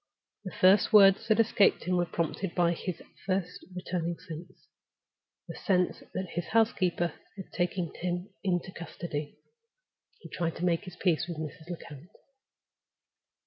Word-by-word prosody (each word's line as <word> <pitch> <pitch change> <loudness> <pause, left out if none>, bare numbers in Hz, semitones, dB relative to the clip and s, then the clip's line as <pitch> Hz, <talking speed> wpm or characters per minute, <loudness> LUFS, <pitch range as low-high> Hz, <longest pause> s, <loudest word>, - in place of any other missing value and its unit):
The 185 - -6
first 190 +4 +6
words 195 -2 +7
that 220 0 +3
escaped 220 -3 +4
him 180 +2 0
were 175 -1 +1
prompted 170 +3 -2
by 175 -1 +3
his 175 +1 -5 0.2
first 185 -2 -1
returning 175 -2 -2
sense—the 170 +3 -14
sense 180 -2 +1
that 185 -1 -3
his 175 0 -3
housekeeper 185 -7 +2 0.2
had 190 - -9
taken 175 -1 -1
him 180 +3 -4
into 185 -1 0
custody. 155 -3 -6 0.8
He - - -12
tried 165 -1 -2
to 175 - -2
make 170 +2 +1
his 180 -2 -9
peace 175 -2 +1
with 170 -3 -5
Mrs. 160 +2 -7
Lecount. 165 -2 -8
180 Hz, 140 wpm, -29 LUFS, 170-190 Hz, 0.8 s, words